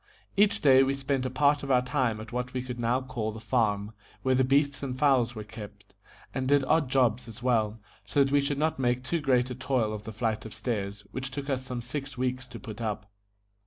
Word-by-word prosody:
Each 205 +1 +4
day 135 -2 +7
we 135 +1 +2
spent 135 -1 -1
a - - -3
part 145 +3 +3
of 140 - -6
our 125 -2 +4
time 125 -4 0
at 110 0 -9
what 125 +1 -3
we 125 - -1
could 125 -1 -6
now 120 +2 +1
call 120 -4 -3
the 110 - -8
farm, 110 -3 0 0.3
where 130 - +3
the 130 +1 +4
beasts 140 +2 +2
and 130 -2 -3
fowls 130 -4 +3
were 110 - -5
kept, 105 -2 -11 0.4
and 130 -1 -2
did 140 0 +4
odd 155 -1 +2
jobs 125 -3 +2
as 115 +2 -10
well, 115 -3 +1 0.2
so 140 - +3
that 135 - -1
we 145 - +5
should 140 0 -1
not 155 -1 0
make 125 0 +1
too 165 +5 -1
great 130 -3 +2
a - - -1
toil 125 -4 0
of 105 - -5
the 110 - -6
flight 110 0 -1
of 110 -2 -8
stairs, 105 -3 -3
which 130 +1 -4
took 140 +2 -4
us 130 -1 -1
some 125 -2 -4
six 135 +2 -5
weeks 130 +1 -2
to 120 -2 -9
put 110 0 -8
up. 105 -2 -3
125 Hz, 235 wpm, -28 LUFS, 115-135 Hz, 0.4 s, day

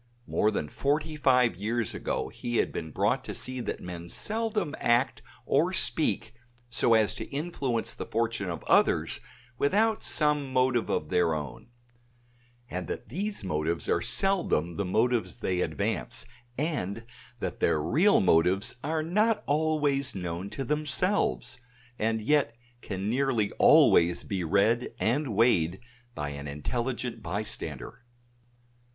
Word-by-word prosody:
More 105 - +1
than 75 - -2
forty 150 - -1
five 125 - +3
years 110 +4 -1
ago - - -3
he 120 -1 -3
had - - +1
been 80 - -5
brought - - 0
to - - -5
see 130 0 -4
that - - -4
men 85 -1 -7
seldom 215 - 0
act 120 +3 +2 0.2
or 165 +7 +2
speak 115 - +1 0.4
so 115 -1 +3
as 110 -2 +3
to - - -5
influence 140 -6 -2
the - - -7
fortunes 115 -3 -1
of 85 - -5
others - - +2 0.4
without 215 +9 +2
some 150 -3 +1
motive 130 -2 +2
of - - -1
their 85 -2 +2
own; 110 +10 -6 1.0
and 90 -4 -5
that - - -6
these 200 - -2
motives 80 -1 -2
are - - +1
seldom 170 - +2
the 100 - -1
motives 115 +6 +1
they 90 -6 -1
advance; - - -2 0.3
and 120 - -2 0.4
that - - -4
their 75 - +2
real 175 - +4
motives 95 +2 +3
are 155 +1 -1
not 210 +6 +1
always 145 -3 +1
known 90 +1 -4
to 135 - -4
themselves, 150 -1 0 0.4
and 110 0 0
yet 140 -2 +2 0.3
can 95 0 -4
nearly 120 -3 +1
always 85 0 +5
be 95 -3 -3
read 105 +7 +1
and 115 +4 0
weighed 95 -6 +3 0.4
by 75 -1 -3
an 70 0 -7
intelligent 120 - -3
bystander. 100 - -4
115 Hz, 135 wpm, -28 LUFS, 95-145 Hz, 1.0 s, always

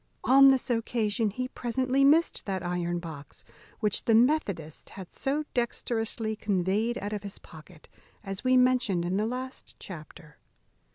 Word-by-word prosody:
On 275 +1 +7
this 265 -1 +2
occasion 225 -2 0
he 255 +5 -4
presently 255 +2 0
missed 310 0 +3
that 190 -2 -3
iron 175 0 -1
box 160 -5 -9 0.4
which 210 -3 0
the 225 - +4
methodist 220 - +1
had 190 -3 -9
so 285 +3 -1
dexterously 225 -2 -1
conveyed 205 +3 0
out 205 +1 -4
of 210 - -3
his 200 -1 -7
pocket, 160 0 -15 0.4
as 195 -1 -6
we 255 0 +4
mentioned 250 -9 +2
in 180 +2 -1
the 215 +2 0
last 255 +2 -6
chapter. 155 -3 -11
220 Hz, 150 wpm, -28 LUFS, 185-255 Hz, 0.4 s, On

